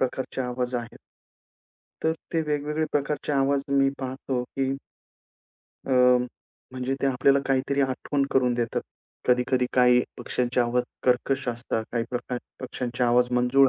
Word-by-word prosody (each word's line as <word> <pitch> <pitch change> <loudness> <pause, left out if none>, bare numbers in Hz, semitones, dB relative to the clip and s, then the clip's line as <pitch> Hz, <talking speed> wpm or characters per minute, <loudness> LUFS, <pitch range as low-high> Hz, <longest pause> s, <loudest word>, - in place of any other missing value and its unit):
प्रकारचे 130 0 -2
आवाज 125 0 -2
आहेत. 120 -1 -4 1.0
तर 160 - +3 0.2
ते 165 - +2
वेगवेगळे 150 +1 0
प्रकारचे 145 0 -1
आवाज 140 0 +2 0.2
मी 135 0 +5
पाहतो 130 -1 -3
की 135 +1 -2 1.1
अ, 135 - -1 0.8
म्हणजे 130 +1 -2
ते 140 - +2
आपल्याला 135 +1 +4
काहीतरी 135 +1 +1
आठवण 140 +1 0
करून 125 -2 +3
देतात. 120 -1 -1 0.5
कधी-कधी 125 0 +3
काही 125 -1 +5 0.2
पक्ष्यांचे 125 0 0
आवाज 120 +1 +2 0.2
कर्कश 130 +2 +1
असतात, 120 -2 -2
काही 115 -1 0
प्रकार 125 0 -3 0.2
पक्ष्यांचे 125 -1 -3
आवाज 120 +1 +3
मंजुळ 135 +2 +5
130 Hz, 130 wpm, -26 LUFS, 125-135 Hz, 1.1 s, मी